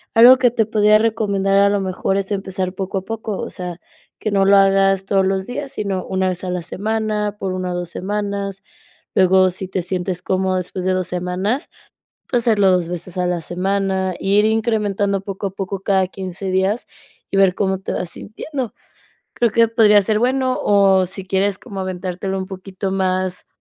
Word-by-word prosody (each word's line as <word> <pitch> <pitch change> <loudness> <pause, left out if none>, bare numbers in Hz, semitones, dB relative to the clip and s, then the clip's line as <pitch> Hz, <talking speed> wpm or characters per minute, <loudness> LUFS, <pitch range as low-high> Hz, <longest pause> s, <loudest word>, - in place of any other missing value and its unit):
algo 245 +3 +9
que 250 -2 +3
te 225 -2 +1
podría 215 -1 +4
recomendar 200 -3 +1
a 200 - +5
lo 200 0 +1
mejor 190 +1 -1
es 195 +1 -3
empezar 190 -2 -2
poco 195 0 -3
a 190 - -14
poco, 220 -2 -4
o - - -4
sea, 180 -1 -7 0.4
que 215 - -2
no 195 -1 +3
lo 200 - +6
hagas 195 0 +3
todos 195 -1 +2
los 190 0 -1
días, 270 +2 -5
sino 195 -3 -3
una 190 0 0
vez 180 0 -5
a 185 - -3
la 180 -1 -2
semana, 210 +2 -2
por 190 -1 -2
1 185 -1 -3
o - - -3
2 175 -1 -4
semanas, 200 +1 -3 0.5
luego 185 0 +5
si 190 +1 -5
te 190 0 -2
sientes 180 0 -3
cómodo 190 0 0
después 185 0 -4
de 185 - +2
2 185 -1 -1
semanas, 180 - -2 0.6
pues, 245 -2 +1
hacerlo 205 -5 +4
2 180 -2 +1
veces 175 0 -6
a 180 - +1
la 175 -1 -1
semana, 190 +1 -1
ir 200 +2 +3
incrementando 210 -3 0
poco 195 0 -4
a - - -11
poco 195 0 -4
cada 190 -2 +2
15 190 0 -5
días 190 +5 0 0.4
y - - -1
ver 190 -2 +5
cómo 190 -1 0
te - - -4
vas 175 - -3
sintiendo. 255 +3 -6 0.6
Creo 235 -1 +2
que 230 +1 +4
podría 215 -2 +5
ser 210 +2 +1
bueno 255 +2 +1
o 195 -2 +4
si 190 +1 -9
quieres 195 +1 0
como 195 -1 -7
aventártelo 185 +1 -3
un 190 - -4
poquito 190 0 -5
más 185 -1 -1
195 Hz, 195 wpm, -20 LUFS, 185-210 Hz, 0.6 s, algo